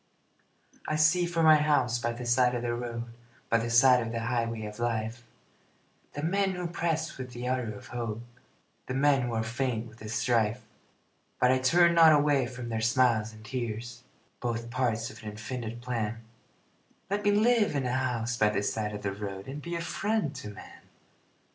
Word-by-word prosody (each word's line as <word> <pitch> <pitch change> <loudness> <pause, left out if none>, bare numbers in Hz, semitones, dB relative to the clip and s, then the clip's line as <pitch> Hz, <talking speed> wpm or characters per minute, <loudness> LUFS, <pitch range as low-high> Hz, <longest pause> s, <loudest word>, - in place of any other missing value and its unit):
I 155 - 0
see 160 +3 +4
from 165 -1 +1
my 155 -1 +8
house 145 -6 +2
by 120 0 -1
the 120 +1 -6
side 125 +1 +3
of 120 - -3
the 120 -1 -1
road 120 -1 -4 0.5
By 115 - +3
the 115 +1 -2
side 125 +1 +6
of 115 -1 -4
the 115 0 -3
highway 115 -1 -1
of 105 +1 -8
life, 115 0 -2 0.9
The 145 - -5
men 195 +3 +1
who 180 -1 -4
press 165 -3 -2
with 125 -1 -7
the 120 +1 -5
ardor 125 -4 -1
of - - -12
hope, 115 -2 -4 0.6
The 130 - -3
men 140 0 +3
who 120 -1 -2
are 110 - 0
faint 115 0 -2
with 115 0 -16
the 110 - -8
strife, 115 0 +1 0.8
But 125 - +4
I 130 - +3
turn 170 +6 +4
not 165 -2 +7
away 145 -3 +3
from 125 -1 -7
their 110 -1 -2
smiles 115 -2 +2
and 110 0 -14
tears, 120 0 -5 0.4
Both 115 -1 -3
parts 120 -3 -1
of 110 - -13
an 110 - -6
infinite 115 +2 -6
plan 115 -2 -3 0.9
Let 205 +1 0
me 205 - +3
live 215 -3 +3
in 135 -2 0
a 125 - -1
house 125 -2 -1
by 105 -2 +4
the 105 -1 -1
side 105 0 -2
of 105 - -7
the 100 -1 -1
road 100 -1 -6
And 140 +3 -6
be 170 +3 -5
a 170 - -2
friend 205 -2 -1
to 105 - -7
man. 105 - -12
120 Hz, 195 wpm, -29 LUFS, 115-145 Hz, 0.9 s, my